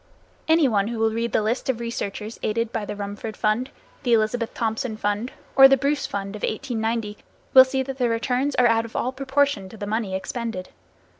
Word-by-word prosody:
Any 320 -2 +5
one 205 -4 +1
who 235 0 -4
will 220 0 +2
read 230 +1 -2
the 215 - +2
list 235 +5 -1
of 245 -3 0
researches 225 -2 -5
aided 230 +1 -1
by 225 -3 -3
the 205 - -5
Rumford 205 +2 -6
Fund, 220 +5 0 0.3
the 245 -4 +1
Elizabeth 230 +1 +1
Thompson 225 0 -2
Fund 205 +3 -1 0.2
or 270 0 +10
the 270 0 +4
Bruce 285 +2 0
Fund 195 0 -4
of 210 - -8
1890 225 -3 -2 0.3
will 260 - +11
see 265 0 -1
that 270 0 -7
the 245 -2 +2
returns 250 +4 0
are 250 - +4
out 230 -1 +4
of 230 - -11
all 255 - 0
proportion 270 -6 0
to 220 - -12
the 205 - -5
money 210 -2 -2
expended. 190 -1 -4
230 Hz, 205 wpm, -24 LUFS, 215-255 Hz, 0.3 s, will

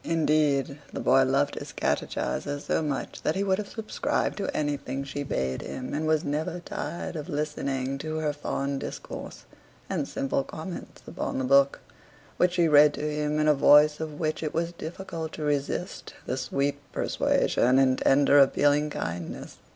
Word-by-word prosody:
Indeed, 150 -3 +1
the - - -5
boy 135 +1 +4
loved 140 +2 +1
his - - -7
catechiser 145 0 -2
so 145 - -1
much 145 -3 -3
that 155 - 0
he 195 - 0
would 190 0 +1
have 210 - -5
subscribed 220 -2 -2
to 200 - -2
anything 140 -2 -2
she 140 +1 -5
bade 65 - -2
him, 130 -1 -6
and 155 +2 -1
was 155 0 +2
never 155 +3 -2
tired 175 0 -5
of 150 -2 -5
listening 135 -3 -2
to 155 +2 -4
her 155 -2 0
fond 140 -1 -2
discourse - - -7 0.4
and - - -2
simple 135 0 -1
comments 165 +5 -8
upon - - -3
the 130 - -1
book, 140 +1 +4 0.6
which 180 0 +3
she 175 -2 +3
read 150 -1 +6
to 150 - -3
him 150 0 -1
in 155 - +2
a 150 - +6
voice 150 +1 +6
of 155 -2 -5
which 155 -1 -1
it 155 -1 -3
was 170 +1 0
difficult 165 -1 -6
to 155 - -5
resist 145 +5 -2
the 125 - -2
sweet 140 +2 -1
persuasion 125 +2 +2
and 130 -1 +3
tender 145 +1 +5
appealing 145 +2 +4
kindness. 85 - -5
145 Hz, 170 wpm, -27 LUFS, 140-155 Hz, 0.6 s, read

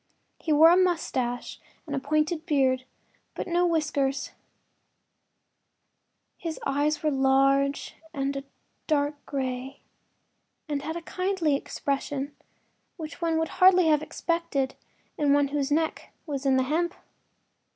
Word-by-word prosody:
He 320 - -2
wore 315 +3 +8
a 350 - +6
moustache 270 -9 0 0.3
and 280 -4 -3
pointed 310 +3 0
beard, 260 -4 +2 0.5
but - - -4
no 350 0 +2
whiskers; 290 -4 0 2.1
his 330 -2 -4
eyes 290 +3 0
were 305 - +2
large 275 +1 +2 0.2
and 275 -2 -2 0.4
dark 290 -1 0
gray, 260 -1 -4 0.9
and 290 -2 -2
had 320 +3 -4
a 340 - -7
kindly 365 -5 0
expression 280 0 -3 0.6
which 320 +1 -8
one 330 -1 +1
would 320 0 0
hardly 365 -2 +7
have 305 -1 +4
expected 315 -3 -1 0.5
in 290 -2 +4
one 285 -1 +3
whose 280 -1 -1
neck 315 +2 -1
was 280 -3 -3
in 265 - +4
the 260 - +3
hemp. 340 +6 0
290 Hz, 120 wpm, -27 LUFS, 275-325 Hz, 2.1 s, wore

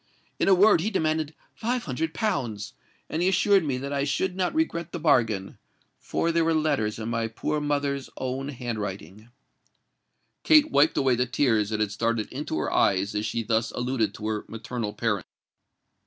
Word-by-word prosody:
In - - +1
a 195 - +7
word, 200 -2 +5
he 205 - 0
demanded 155 -5 -1 0.2
five 240 +2 -2
hundred 160 +3 -2
pounds; 125 - -2 0.3
and 160 - -2
he 180 - +3
assured 195 0 +4
me 140 -4 -1
that 140 +2 -4
I 140 -1 0
should 180 +6 -1
not 185 -1 0
regret 170 - -1
the 175 - -3
bargain—for 120 - -1
there 165 0 +2
were 165 0 +2
letters 145 -9 0
in 110 0 -5
my 115 -1 -1
poor 150 +6 -2
mother's 140 -2 -1
own 130 +2 -3
handwriting." 110 -4 -6 1.1
Kate 310 -1 +5
wiped 150 +3 +4
away 135 -2 +3
the 125 +1 +1
tears 115 -5 +2
that 110 -1 -1
had 105 -2 0
started 115 +1 -1
into 140 - -3
her 75 - -1
eyes 100 +2 +2
as 105 +1 -1
she 115 +1 -2
thus 110 0 0
alluded 125 -2 -1
to 105 - -5
her 110 -1 -2
maternal 115 -1 -4
parent. 105 -3 -1
130 Hz, 175 wpm, -26 LUFS, 110-160 Hz, 1.1 s, a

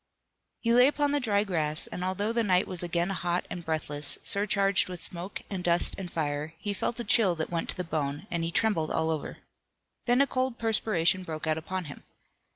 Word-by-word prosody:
He 230 0 +2
lay 250 +2 +7
upon 290 0 +1
the 290 - +2
dry 205 -5 +2
grass, 155 -6 -1
and 180 - -5
although 200 +4 -1
the 235 - +2
night 185 -4 +3
was 180 -2 -5
again 175 +1 0
hot 175 -1 -1
and 175 - -5
breathless, 150 -2 -1
surcharged 200 -1 +2
with 180 -1 -6
smoke 180 +4 -5
and 190 -3 -4
dust 175 0 +5
and 180 -3 -7
fire, 150 0 -2
he 205 +4 -3
felt 230 +4 -2
a - - -2
chill 205 -7 +4
that 160 +1 -4
went 170 -1 -2
to - - 0
the 180 - -2
bone, 150 -2 -3
and 170 -1 -1
he 165 - 0
trembled 170 -5 +1
all 160 0 +1
over. 155 -3 -4 0.7
Then 245 +1 +4
a 280 - +6
cold 255 -2 -1
perspiration 210 -5 +2
broke 160 -3 -5
out 155 0 +1
upon 185 +2 -4
him. 145 - -9
180 Hz, 210 wpm, -28 LUFS, 160-210 Hz, 0.7 s, lay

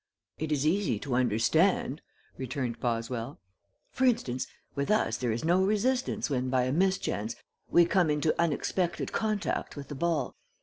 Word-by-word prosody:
"It 155 0 -3
is 145 -1 +1
easy 180 - +2
to 130 +5 -4
understand," 130 - +2 0.3
returned 130 -2 -3
Boswell. 115 +1 -2 0.5
"For 260 - +1
instance, 130 - +1 0.3
with 140 0 -2
us 210 - +2
there 120 -2 -1
is 115 +7 -2
no 180 +3 +4
resistance 230 +6 +1
when 130 -3 -1
by 130 -1 +2
a 130 - 0
mischance 155 - 0 0.3
we 175 - +6
come 175 -2 +2
into 150 +1 +2
unexpected 170 +2 0
contact 215 -2 -1
with 140 -2 -8
the - - -4
ball. 155 -2 -1
145 Hz, 150 wpm, -29 LUFS, 125-185 Hz, 0.5 s, we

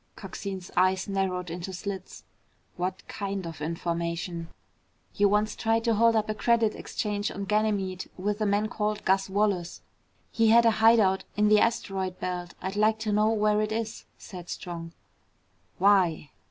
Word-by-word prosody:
Coxine's 190 -3 -7
eyes 185 +1 +2
narrowed 185 -3 -2
into 175 +2 -5
slits. 190 0 -6 0.5
"What 185 +2 -4
kind 195 -2 -4
of 165 -2 -8
information?" 170 +1 -3 0.7
"You 205 0 +3
once 210 +1 +1
tried 225 0 +1
to 230 -1 +2
hold 230 +1 +4
up 215 -1 +1
a 215 - -1
Credit 230 0 +2
Exchange 205 -1 -3
on 200 - -5
Ganymede 205 -3 0
with 205 +3 -2
a 215 - +2
man 205 +2 +1
called 210 -1 -2
Gus 195 +1 +2
Wallace. 195 -3 -1 0.5
He 225 -1 +2
had 235 +1 +6
a 230 - +6
hide 225 +1 +7
out 190 -2 +2
in 210 0 +4
the 210 0 +6
asteroid 195 -5 -1
belt. 180 -1 -4
I'd 190 +2 -3
like 215 +1 +3
to 215 -1 -1
know 210 +1 +3
where 210 -1 +2
it 215 0 -1
is," 220 0 -4
said 180 -3 -10
Strong. 165 -2 -6 0.9
"Why?" 180 -6 +3
200 Hz, 165 wpm, -27 LUFS, 185-215 Hz, 0.9 s, hide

